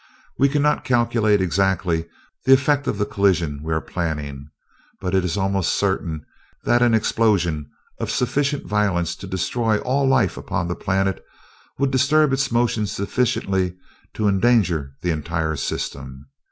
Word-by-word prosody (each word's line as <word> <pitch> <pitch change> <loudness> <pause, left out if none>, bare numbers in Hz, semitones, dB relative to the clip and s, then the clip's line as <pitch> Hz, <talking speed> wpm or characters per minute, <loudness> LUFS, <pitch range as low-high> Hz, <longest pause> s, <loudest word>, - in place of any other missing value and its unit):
We 140 +1 +5
cannot 150 +1 +1
calculate 115 -4 +2
exactly 90 -2 0 0.4
the 135 - +7
effect 140 +2 +2
of - - -1
the 105 - 0
collisions 85 -9 0
we 80 +1 -5
are 80 - +1
planning 75 -5 -4 0.5
but 90 -1 -3
it 95 -1 +3
is 90 +2 -2
almost 95 -3 0
certain 85 -6 -1 0.4
that 120 0 +3
an 120 -2 +4
explosion 90 -10 +1 0.3
of - - -3
sufficient 140 +3 0
violence 100 -5 0
to 95 - -9
destroy 110 +4 0
all 135 +2 +1
life 135 - +2
upon 85 -1 -3
the 90 - -2
planet 95 0 -1 0.5
would 140 0 +1
disturb 140 +2 +3
its 135 -1 0
motion 115 -3 +1
sufficiently 95 -3 -1 0.4
to 105 - 0
endanger 95 - +2
the 90 - +1
entire 80 0 -2
system. 65 -1 -5
95 Hz, 145 wpm, -22 LUFS, 85-120 Hz, 0.5 s, the